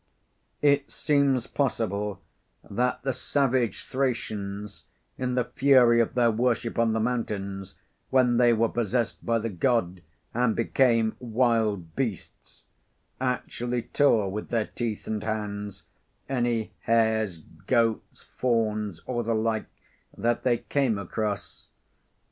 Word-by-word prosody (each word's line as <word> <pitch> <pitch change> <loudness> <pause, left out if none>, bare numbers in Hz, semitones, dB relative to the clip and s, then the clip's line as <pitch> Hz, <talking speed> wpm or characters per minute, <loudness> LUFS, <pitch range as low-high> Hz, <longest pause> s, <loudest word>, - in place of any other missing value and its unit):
It 140 -1 +3
seems 140 -4 +2
possible 105 -7 -1 0.5
that 125 +5 -1
the 135 0 0
savage 130 -2 0
Thracians, 105 -6 -3 0.3
in 125 -1 -2
the 125 - +2
fury 125 -2 +5
of 115 - -2
their 120 -2 +4
worship 115 0 0
on 115 -1 +3
the 110 - 0
mountains, 100 -5 -3 0.3
when 125 -2 +3
they 120 -1 +5
were 115 0 +3
possessed 120 0 -1
by 115 0 +1
the 115 0 -3
God 95 -3 0 0.3
and 120 -1 +2
became 115 -2 +2
"wild 110 -7 0
beasts," 115 - -5 0.5
actually 125 -1 -2
tore 110 -9 +2
with 105 +2 -5
their 115 -2 +1
teeth 115 -3 -4
and 110 -1 -3
hands 105 -2 -4 0.4
any 120 -4 0
hares, 110 -5 +1 0.3
goats, 115 -3 0
fawns, 110 -6 0
or 120 -2 -1
the 115 0 0
like 110 0 0 0.5
that 120 0 0
they 120 -2 +2
came 130 -4 0
across. 100 +1 -4
115 Hz, 120 wpm, -27 LUFS, 105-125 Hz, 0.5 s, fury